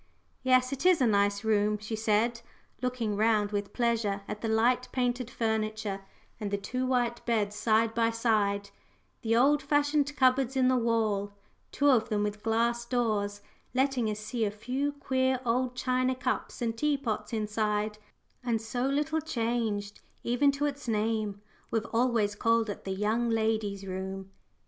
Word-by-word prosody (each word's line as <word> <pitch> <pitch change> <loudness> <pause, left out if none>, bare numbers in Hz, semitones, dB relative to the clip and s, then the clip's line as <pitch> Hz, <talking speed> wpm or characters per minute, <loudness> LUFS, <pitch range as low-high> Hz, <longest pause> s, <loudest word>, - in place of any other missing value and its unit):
"Yes, 255 0 +3
it 275 - -4
is 365 -2 +5
a 260 - +3
nice 200 -1 +2
room," 210 -1 +2
she 215 +2 -5
said, 225 +2 +1 0.4
looking 245 -4 -1
round 210 -1 +2
with 205 -1 -2
pleasure 230 -4 0
at 210 0 -5
the 225 - -2
light 235 +3 +2
painted 245 -1 -1
furniture 215 -3 -2 0.4
and 210 -2 -3
the 200 - 0
two 255 +6 -3
white 245 -2 0
beds 210 -3 +1
side 220 +1 +2
by 230 0 +2
side, 210 -3 0 0.5
the 230 -1 +1
old 285 +5 +4
fashioned 290 0 +1
cupboards 260 -1 +3
in 255 -1 +4
the 255 - +3
wall, 220 -4 0 0.4
two 285 0 +3
of 235 -3 +2
them 210 -2 +1
with 210 0 -3
glass 235 +2 +1
doors, 215 -4 -1 0.3
letting 260 -4 +1
us 210 0 -3
see 220 +2 -3
a 210 - +2
few 250 +7 -2
queer 260 -2 0
old 250 +2 0
china 255 0 +1
cups 250 -1 -3
and 225 -1 -2
teapots 280 -7 -1
inside; 210 -1 -1 0.4
"and 235 -2 0
so 245 +3 -2
little 300 +3 0
changed, 225 -7 -2 0.2
even 245 +4 +3
to 280 +1 -1
its 285 -2 -4
name. 215 -2 -1 0.3
We've 225 -2 -1
always 230 -3 +2
called 230 0 +1
it - - -9
the 190 - -3
young 220 +4 0
ladies' 220 -3 0
room." 190 0 -5
230 Hz, 160 wpm, -29 LUFS, 210-255 Hz, 0.5 s, is